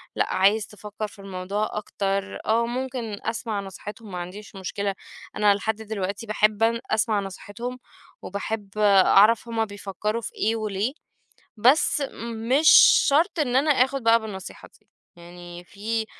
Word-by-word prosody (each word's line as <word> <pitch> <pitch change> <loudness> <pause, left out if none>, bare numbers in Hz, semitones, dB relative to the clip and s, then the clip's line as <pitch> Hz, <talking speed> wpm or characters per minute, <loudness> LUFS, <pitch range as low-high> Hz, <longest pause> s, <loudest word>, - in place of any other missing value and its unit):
لأ، - - 0
عايز 205 +3 +3
تفكر 210 +1 -7
في 205 - -17
الموضوع 195 +2 -3
أكتر. 200 -1 -3
آه، 230 +2 +2
ممكن 240 -3 -4
أسمع 225 -2 -3
نصيحتهم، 205 +2 -9
ما 180 - -5
عنديش 195 +4 -9
مشكلة. 195 +1 -3 0.4
أنا 210 -1 +4
لحد 220 +2 -2
دلوقتي 205 -1 -5
باحب 215 0 +1
أن 230 +1 +2
أسمع 220 -1 +2
نصيحتهم 205 +6 -7 0.4
وباحب 200 +1 -5
أعرف 210 +2 +5
هُم 225 -1 -1
بيفكروا 205 +2 -4
في 225 - -6
إيه 220 +2 0
وليه، 215 +2 -2 0.7
بس 270 +6 +4 0.5
مش 295 +5 +5 0.4
شرط 320 +6 +2
إن 255 -4 +1
أنا 290 +3 +3
آخد 270 -1 +2
بقى 230 0 +5
بالنصيحة 205 -4 -9
دي. - - -37 0.3
يعني 175 0 -11
في 220 +4 -3
210 Hz, 140 wpm, -24 LUFS, 200-230 Hz, 0.7 s, أعرف